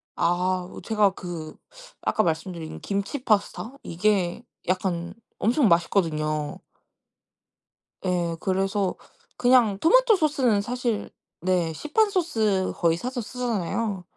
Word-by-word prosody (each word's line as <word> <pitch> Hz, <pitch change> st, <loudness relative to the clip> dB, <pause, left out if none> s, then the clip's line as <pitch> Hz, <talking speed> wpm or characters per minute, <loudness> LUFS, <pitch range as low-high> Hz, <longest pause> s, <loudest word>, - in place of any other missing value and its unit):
아하 180 Hz, +1 st, 0 dB
아 -, -, -7 dB
제가 210 Hz, -3 st, +3 dB
그 170 Hz, -4 st, -7 dB, 0.5 s
아까 215 Hz, -, +1 dB
말씀드린 165 Hz, -1 st, -3 dB
김치 200 Hz, +7 st, -3 dB
파스타 215 Hz, +2 st, 0 dB
이게 185 Hz, +2 st, 0 dB, 0.2 s
약간 180 Hz, -1 st, -1 dB, 0.3 s
엄청 240 Hz, +4 st, +3 dB
맛있거든요. 155 Hz, -4 st, +1 dB, 1.5 s
예. 175 Hz, -2 st, 0 dB
그래서 195 Hz, +1 st, 0 dB, 0.4 s
그냥 245 Hz, -5 st, +4 dB
토마토 485 Hz, -, +5 dB
소스는 275 Hz, -, +2 dB
사실 240 Hz, -1 st, -2 dB, 0.3 s
네 180 Hz, -2 st, +1 dB
시판 365 Hz, -, +1 dB
소스 220 Hz, -, +1 dB
거의 165 Hz, -1 st, +2 dB
사서 250 Hz, +6 st, -3 dB
쓰잖아요. 220 Hz, -4 st, -2 dB
195 Hz, 235 characters per minute, -25 LUFS, 175-240 Hz, 1.5 s, 토마토